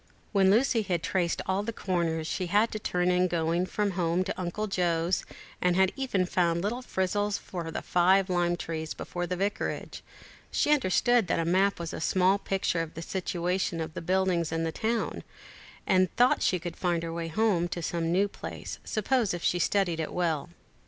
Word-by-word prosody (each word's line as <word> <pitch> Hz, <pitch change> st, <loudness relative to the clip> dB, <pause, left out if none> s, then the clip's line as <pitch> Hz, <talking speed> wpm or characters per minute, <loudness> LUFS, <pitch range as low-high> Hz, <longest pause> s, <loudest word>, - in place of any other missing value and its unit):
When 195 Hz, -2 st, +4 dB
Lucy 230 Hz, +2 st, +3 dB
had 180 Hz, -5 st, -2 dB
traced 175 Hz, -3 st, 0 dB
all 190 Hz, +1 st, 0 dB
the 220 Hz, +3 st, -3 dB
corners 170 Hz, -6 st, -1 dB
she 180 Hz, +3 st, -2 dB
had 210 Hz, +5 st, +3 dB
to 215 Hz, -, -4 dB
turn 180 Hz, -3 st, +1 dB
in 180 Hz, 0 st, +3 dB
going 170 Hz, +1 st, 0 dB
from 205 Hz, 0 st, 0 dB
home 175 Hz, 0 st, +1 dB
to 190 Hz, -, -3 dB
Uncle 185 Hz, +4 st, -2 dB
Joe's, 175 Hz, -3 st, 0 dB, 0.4 s
and 180 Hz, -1 st, +3 dB
had 190 Hz, 0 st, +4 dB
even 250 Hz, -9 st, 0 dB
found 170 Hz, -1 st, +1 dB
little 235 Hz, +5 st, -2 dB
frizzles 205 Hz, -2 st, -1 dB
for 170 Hz, -3 st, -6 dB
the -, -, -5 dB
five 185 Hz, +2 st, +3 dB
lime 175 Hz, -1 st, +1 dB
trees 160 Hz, -1 st, -4 dB
before 175 Hz, 0 st, -4 dB
the 180 Hz, -, -2 dB
Vicarage, 200 Hz, +3 st, -3 dB, 0.5 s
she -, -, +1 dB
understood 240 Hz, -3 st, +3 dB
that -, -, +1 dB
the 165 Hz, -, 0 dB
map 190 Hz, +3 st, +2 dB
was 170 Hz, -1 st, -5 dB
a -, -, -5 dB
small 185 Hz, +3 st, +3 dB
picture 190 Hz, -4 st, 0 dB
of 165 Hz, -1 st, -6 dB
the 165 Hz, -, -5 dB
situation 180 Hz, -1 st, -2 dB
of 160 Hz, -1 st, -4 dB
the -, -, -5 dB
buildings 180 Hz, -2 st, +1 dB
in 165 Hz, 0 st, -1 dB
the 165 Hz, -, -1 dB
town, 225 Hz, +5 st, -2 dB, 0.6 s
and 185 Hz, -2 st, +3 dB
thought 245 Hz, +1 st, +4 dB
she 185 Hz, -, +2 dB
could 170 Hz, -1 st, -6 dB
find 175 Hz, -2 st, 0 dB
her 165 Hz, 0 st, -4 dB
way 165 Hz, 0 st, -3 dB
to 175 Hz, -3 st, 0 dB
some 165 Hz, 0 st, -1 dB
new 195 Hz, +4 st, +3 dB
place, -, -, -7 dB
suppose 220 Hz, -2 st, 0 dB
she 175 Hz, -, +2 dB
studied 175 Hz, -3 st, +1 dB
it 160 Hz, -, -3 dB
well. 170 Hz, -3 st, -1 dB
180 Hz, 190 wpm, -28 LUFS, 170-195 Hz, 0.6 s, When